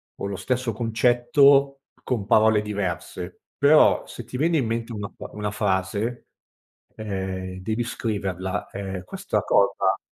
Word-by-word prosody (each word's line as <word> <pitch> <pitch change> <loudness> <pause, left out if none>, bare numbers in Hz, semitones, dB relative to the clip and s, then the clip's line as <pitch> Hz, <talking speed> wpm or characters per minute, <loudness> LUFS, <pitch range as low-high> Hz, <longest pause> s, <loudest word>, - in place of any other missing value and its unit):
o - - -5
lo 100 - -4
stesso 125 -2 -1
concetto, 125 +5 +3 0.2
con 115 -6 -2
parole 110 0 +4
diverse. 95 -3 -4 0.2
Però, 145 +2 +5
se 120 - -9
ti 125 - -7
viene 165 +3 +2
in 130 - +1
mente 115 +1 -3
una 105 -1 -5
pa - - -9
una 105 -1 -3
frase, 105 +3 -1 0.7
ehm, 95 -3 -4
devi 110 +5 -2
scriverla. 95 -5 -3
Ehm, 95 -2 -5
questa - - -2
cosa - - +2
110 Hz, 135 wpm, -24 LUFS, 95-120 Hz, 0.7 s, Però